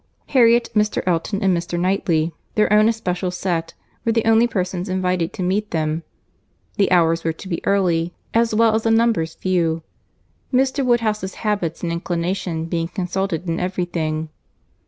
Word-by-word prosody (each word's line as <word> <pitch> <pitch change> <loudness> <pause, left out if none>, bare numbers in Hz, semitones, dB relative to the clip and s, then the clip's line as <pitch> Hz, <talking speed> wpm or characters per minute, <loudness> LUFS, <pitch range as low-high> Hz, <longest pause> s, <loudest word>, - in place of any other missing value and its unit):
Harriet, 235 -2 +5
Mr. 210 -1 +1
Elton, 185 +4 0
and 190 -2 +3
Mr. 170 0 -3
Knightley, 170 -3 +1 0.2
their 210 -1 +3
own 215 +1 +6
especial 185 -5 -2
set, 175 -2 -2 0.3
were 230 - +1
the 230 0 +1
only 225 +1 +5
persons 185 -3 -2
invited 185 -2 0
to 185 - -5
meet 205 +4 0
them;—the 160 +4 -4
hours 165 -2 +3
were 165 - +1
to 165 +4 -10
be 170 -3 -3
early, 175 -4 +2 0.2
as 230 -1 +2
well 225 0 +4
as 220 - +2
the 225 - 0
numbers 225 -8 +2
few; 165 -3 0 0.7
Mr. 265 +1 +2
Woodhouse's 220 -6 0
habits 190 -7 -1
and 170 - -1
inclination 170 0 -2
being 165 0 -2
consulted 185 -1 -3
in 165 0 -1
every 180 0 -1
thing. 160 -2 -3
185 Hz, 155 wpm, -21 LUFS, 170-215 Hz, 0.7 s, own